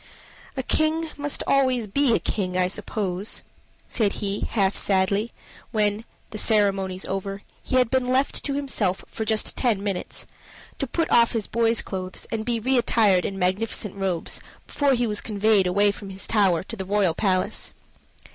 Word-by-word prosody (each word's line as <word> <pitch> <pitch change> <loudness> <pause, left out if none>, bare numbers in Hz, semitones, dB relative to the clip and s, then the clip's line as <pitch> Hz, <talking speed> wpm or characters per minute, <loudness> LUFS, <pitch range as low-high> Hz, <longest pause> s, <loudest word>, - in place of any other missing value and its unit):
"A 265 - -1
king 315 +4 +1
must 290 0 -2
be - - -5
always 260 -4 +2
a 280 -5 +4
king, 185 -3 -2
I 180 -1 +3
suppose," 200 -1 -2 0.4
said 210 -5 +1
he 200 0 -2
half 195 -3 +1
sadly, 200 +3 +1 0.4
when, 210 0 0 0.3
the 215 - -5
ceremonies 195 -4 +1
over, 195 +1 -4 0.2
he - - -3
had 250 -3 +3
been 260 -1 +1
left 260 +2 +1
to 280 - -1
himself 230 -10 -1
for 220 - -5
just 220 0 +1
ten 225 -6 +1
minutes, 195 -3 -4 0.5
to 275 - -1
put 330 +6 0
off 235 -1 +5
his 225 -3 0
boy's 230 0 +1
clothes 185 -1 -6
and 225 -1 -2
be 235 -1 0
reattired 225 -6 +3
in 195 - -3
magnificent 195 +2 0
robes, 190 -4 -2 0.2
before 280 -2 +1
he 245 0 +1
was 210 -2 0
conveyed 210 -2 +2
away 200 +3 +3
from 200 0 -9
his 195 0 -4
tower 190 -6 +2
to 230 - -7
the 190 - -4
royal 195 -3 +1
palace. 185 0 -1
210 Hz, 165 wpm, -24 LUFS, 195-235 Hz, 0.5 s, off